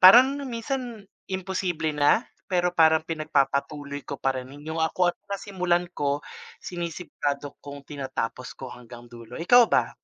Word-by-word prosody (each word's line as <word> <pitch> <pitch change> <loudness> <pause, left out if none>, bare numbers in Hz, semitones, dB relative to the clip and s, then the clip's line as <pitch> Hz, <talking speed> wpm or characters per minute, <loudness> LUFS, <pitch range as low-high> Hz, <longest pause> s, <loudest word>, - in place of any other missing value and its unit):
parang 255 +9 +9
minsan 240 -2 -3 0.3
imposible 185 -4 -1
na 145 +10 +5 0.2
pero 180 -1 +2
parang 160 -2 +5
pinag-papatuloy 145 -2 -1
ko 140 - -6
pa 135 - +3
yung 145 +5 -6
ako 175 +2 +3
at - - -19
nasimulan 180 -3 0
ko 145 -3 -1 0.4
sini-sigurado 150 -5 -4
kung 140 0 -9
tina-tapos 130 -3 -4
ko 130 -2 -8
hanggang 120 0 -11
dulo 115 -1 -11
ikaw 235 +8 +6
ba? - - +2
160 Hz, 130 wpm, -26 LUFS, 140-185 Hz, 0.4 s, parang